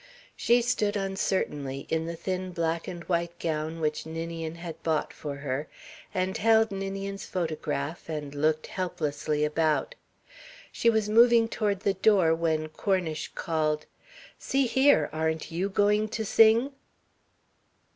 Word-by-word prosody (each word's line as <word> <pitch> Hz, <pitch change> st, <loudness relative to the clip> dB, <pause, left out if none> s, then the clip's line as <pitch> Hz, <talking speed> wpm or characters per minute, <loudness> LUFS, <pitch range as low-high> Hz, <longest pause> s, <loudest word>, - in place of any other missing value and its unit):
She 240 Hz, 0 st, +3 dB
stood 215 Hz, -4 st, 0 dB
uncertainly, 185 Hz, -8 st, -2 dB
in 160 Hz, 0 st, -1 dB
the 170 Hz, -, -4 dB
thin 185 Hz, +1 st, -4 dB
black 165 Hz, -1 st, -1 dB
and 175 Hz, -1 st, -6 dB
white 170 Hz, -1 st, -1 dB
gown 160 Hz, 0 st, -3 dB
which 155 Hz, -1 st, -1 dB
Ninian 165 Hz, 0 st, -5 dB
had 165 Hz, -1 st, -8 dB
bought 160 Hz, -2 st, -1 dB
for 145 Hz, -2 st, -6 dB
her, 140 Hz, +1 st, -3 dB, 0.4 s
and 185 Hz, -1 st, -1 dB
held 225 Hz, 0 st, +4 dB
Ninian's 195 Hz, 0 st, -4 dB
photograph 160 Hz, -3 st, -3 dB
and 150 Hz, -3 st, -4 dB
looked 155 Hz, +2 st, +1 dB
helplessly 150 Hz, -4 st, -2 dB
about. 155 Hz, -, +1 dB, 0.8 s
She 235 Hz, -, +2 dB
was 220 Hz, -2 st, +2 dB
moving 230 Hz, +1 st, +6 dB
toward 205 Hz, -4 st, -1 dB
the 200 Hz, -, +1 dB
door 190 Hz, -4 st, +4 dB
when 160 Hz, -1 st, 0 dB
Cornish 170 Hz, -2 st, -1 dB
called: 155 Hz, -2 st, -1 dB, 0.5 s
"See 275 Hz, 0 st, +1 dB
here! 265 Hz, +4 st, +4 dB
Aren't 160 Hz, 0 st, -2 dB
you 180 Hz, +4 st, -1 dB
going 205 Hz, +2 st, +2 dB
to 220 Hz, +1 st, -3 dB
sing?" 225 Hz, +6 st, +5 dB
170 Hz, 135 wpm, -28 LUFS, 155-205 Hz, 0.8 s, moving